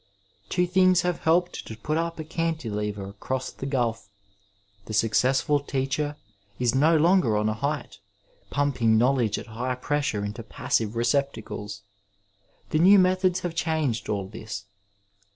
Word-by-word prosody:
Two 180 0 +2
things 185 0 +4
have 180 -1 -1
helped 175 +2 +1
to 110 - -7
put 150 +7 -2
up 165 +1 -1
a 160 - -4
cantilever 115 - -3
across 130 +6 -4
the 135 - -6
gulf. 120 -6 -1 0.8
The 110 - -7
successful 130 +7 +2
teacher 140 +2 -2 0.4
is 125 -2 +1
no 155 +5 +4
longer 160 - +3
on 105 +1 +1
a 110 - +1
height, 140 -2 -3 0.5
pumping 125 -6 +2
know 125 +4 +4
ledge 115 -6 0
at - - -6
high 125 +3 -3
pressure 135 -6 -1
into 105 +3 -5
passive 110 0 -1
receptacles. 115 -5 -2 0.9
The 155 - +2
new 190 +5 +7
methods 185 -1 +3
have 175 -2 -3
changed 155 -8 -1
aU 100 -2 -1
this. 105 -2 -7
135 Hz, 145 wpm, -26 LUFS, 110-160 Hz, 0.9 s, new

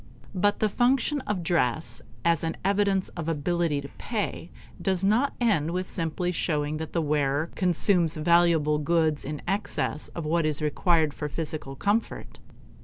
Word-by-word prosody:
But 205 +2 +2
the 215 - +4
function 260 +6 +1
of 195 -4 -1
dress 160 -4 0 0.2
as 170 -1 +2
an 165 0 -2
evidence 200 -1 +2
of 165 -2 -5
ability 165 -1 0
to 140 - -9
pay 205 -6 -3 0.3
does 190 -2 0
not 225 +8 +2
end 195 -11 +2
with 185 +2 -2
simply 175 +1 -2
showing 150 -3 -1
that 160 0 -6
the 165 - 0
wearer 145 +1 0
consumes 175 -2 +2
valuable 160 -2 +3
goods 155 -1 +1
in 150 +1 -5
excess 195 -5 -1
of 170 - -4
what 160 +1 +1
is 150 -1 0
required 155 0 +2
for 150 +1 -4
physical 150 -3 -5
comfort. 205 +9 -2
170 Hz, 155 wpm, -26 LUFS, 150-190 Hz, 0.3 s, the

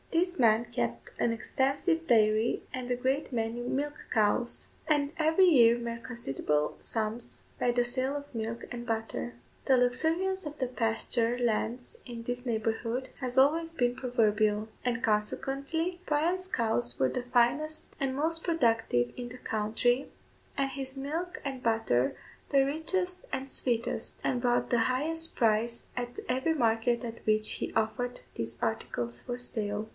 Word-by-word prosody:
This 355 0 +1
man 230 -1 +5
kept 120 - -3
an 235 - +2
extensive 275 +8 0
dairy 220 -1 +3
and 250 -1 -4
a - - +3
great 265 +4 -1
many 230 0 -1
milch 280 +4 -1 0.2
cows, 220 +3 +1 0.2
and 290 -1 +2
every 320 +4 +5
year 240 -9 +6
made 235 -1 -5
considerable 150 - -1
sums 225 +1 -3
by 245 - +3
the 240 0 +2
sale 260 +3 -1
of 285 -3 -10
milk 225 +1 -3
and 240 -1 -5
butter. 225 +1 -3 0.3
The 265 - +5
luxuriance 325 +10 +1
of 300 0 -6
the 260 - -1
pasture 230 0 0
lands 245 - -1
in 235 -2 -7
this 245 +1 -4
neighbourhood 230 +2 -1
has 250 -1 -3
always 325 +5 +4
been 245 -5 +1
proverbial; 215 -4 +1 0.2
and, 240 -1 -1
consequently, 275 +11 -1
Bryan's 345 +5 +1
cows 170 - +1
were 130 - +3
the 250 - -3
finest 250 +6 +1
and 270 -1 0
most 325 +3 +1
productive 225 - +2
in 245 -1 -5
the 250 - -9
country, 235 +4 0 0.5
and 275 -1 +1
his 270 0 -3
milk 320 +6 -3
and 265 -2 -4
butter 220 - +1 0.3
the 275 -1 +4
richest 360 +5 -1
and 265 0 -3
sweetest, 235 -3 -1
and 245 - 0
brought 245 -1 +1
the 240 -2 +4
highest 325 +5 0
price 230 0 +1
at 245 0 -4
every 260 +6 +1
market 235 -2 +2
at 230 -1 -7
which 215 0 +2
he - - -3
offered 245 +3 -1
these 115 0 -4
articles 120 +2 -2
for 245 - -4
sale. 215 -3 -3
245 Hz, 150 wpm, -30 LUFS, 225-275 Hz, 0.5 s, year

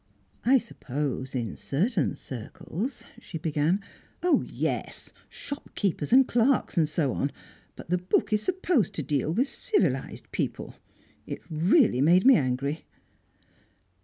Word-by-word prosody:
"I 265 +3 +6
suppose 140 - -4
in 115 -5 -2
certain 180 - 0
circles" 165 - -6 0.2
she 165 - -7
began. 160 +4 +1 0.4
"Oh 360 - +4
yes! - - -3 0.2
Shopkeepers 200 - -4
and 260 +1 +7
clerks 245 +3 +2
and 160 -4 +3
so 150 -4 0
on. 140 - -1 0.4
But - - -10
the 180 - +3
book 180 +4 +1
is 210 - +2
supposed 355 - +1
to - - -2
deal 150 0 0
with 250 - +2
civilised 170 - -1
people. - - -3 0.5
It - - -6
really 165 - +4
made 175 - +5
me 265 -1 +9
angry!" 140 +2 -1
170 Hz, 130 wpm, -27 LUFS, 145-240 Hz, 0.5 s, me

